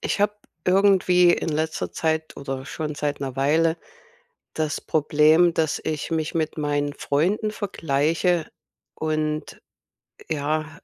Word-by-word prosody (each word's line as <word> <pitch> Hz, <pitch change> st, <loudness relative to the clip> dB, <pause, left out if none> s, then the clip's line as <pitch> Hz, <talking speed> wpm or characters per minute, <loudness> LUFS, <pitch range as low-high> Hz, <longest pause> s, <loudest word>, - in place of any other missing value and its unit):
ich -, -, -2 dB
habe 205 Hz, 0 st, +2 dB, 0.3 s
irgendwie 180 Hz, -2 st, +4 dB
in -, -, -1 dB
letzter 155 Hz, +1 st, -2 dB
Zeit 160 Hz, -1 st, -1 dB
oder 135 Hz, -1 st, -5 dB
schon 150 Hz, +1 st, -4 dB
seit 145 Hz, 0 st, -2 dB
'ner 135 Hz, -2 st, -4 dB
Weile 160 Hz, +4 st, +2 dB, 0.8 s
das 155 Hz, -1 st, -1 dB
Problem, 155 Hz, +3 st, +3 dB
dass 160 Hz, -2 st, 0 dB
ich 155 Hz, 0 st, -3 dB
mich 160 Hz, -2 st, -1 dB
mit 160 Hz, -1 st, -1 dB
meinen 145 Hz, -1 st, 0 dB
Freunden 180 Hz, +10 st, 0 dB
vergleiche 165 Hz, -3 st, 0 dB, 0.5 s
und, 155 Hz, -1 st, -2 dB, 0.7 s
ja, 155 Hz, 0 st, -2 dB
155 Hz, 120 wpm, -24 LUFS, 150-170 Hz, 0.8 s, irgendwie